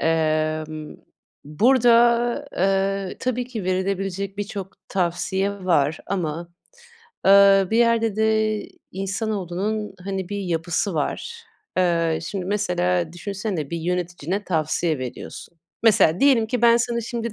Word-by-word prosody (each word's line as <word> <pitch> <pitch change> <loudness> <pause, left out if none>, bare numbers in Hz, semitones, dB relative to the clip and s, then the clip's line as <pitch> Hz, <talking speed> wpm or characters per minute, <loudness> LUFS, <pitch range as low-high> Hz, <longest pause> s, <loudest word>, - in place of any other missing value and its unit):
Emm, 155 -1 -1 0.5
burada, 235 - +3
eee, 195 0 0
tabii 250 -1 -1
ki 235 -6 -6
verilebilecek 195 +1 -2
birçok 200 -2 -5
tavsiye 190 +2 -1
var 155 -4 +2
ama, 170 -3 -3 0.8
eee, 195 0 +7
bir 225 - +2
yerde 230 -3 +2
de 220 -1 +1 0.3
insanoğlunun, 195 +1 -3
hani, 190 -2 -3
bir 205 - -3
yapısı 175 +1 -1
var. 465 - -3 0.4
Eee, 170 -3 +2
şimdi 185 +2 -4
mesela 180 -4 0
düşünsene 190 -4 -4
bir 170 - -2
yöneticine 175 +2 -3
tavsiye 160 -2 0
veriyorsun. 130 +6 -8 0.2
Mesela 210 -7 +4
diyelim 260 -6 +4
ki 240 +1 -2
ben, 235 0 +7
sana 235 0 0
şimdi 235 -1 -4
195 Hz, 115 wpm, -23 LUFS, 170-220 Hz, 0.8 s, eee